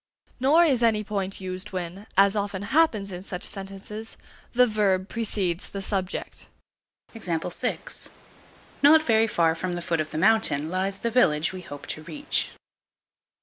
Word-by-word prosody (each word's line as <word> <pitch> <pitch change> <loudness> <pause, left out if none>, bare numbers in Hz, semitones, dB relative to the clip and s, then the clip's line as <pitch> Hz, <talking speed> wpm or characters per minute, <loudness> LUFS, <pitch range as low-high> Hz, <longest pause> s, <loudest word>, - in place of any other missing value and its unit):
Nor 295 +7 +5
is 265 -7 +2
any 220 -2 +3
point 195 -2 -3
used 185 +2 -5
when, 185 +3 -5
as 195 +1 +5
often 200 -1 -2
happens 225 -11 +3
in 180 0 -7
such 180 -2 -6
sentences, 195 +3 -7 0.3
the 250 +1 +5
verb 200 -4 +1
precedes 200 -6 0
the 195 - -5
subject. 190 -2 -3 0.7
Not 250 - -1
very 225 -4 +3
far 165 -6 +2
from 175 +2 -3
the 175 - -3
foot 165 -2 0
of 155 - -5
the - - -5
mountain 165 -6 +3
lies 190 +1 -1
the 235 +3 -2
village 160 -10 +3
we 185 - -6
hope 145 -5 -9
to 155 - -4
reach. 290 - -1
195 Hz, 150 wpm, -25 LUFS, 180-225 Hz, 0.7 s, Nor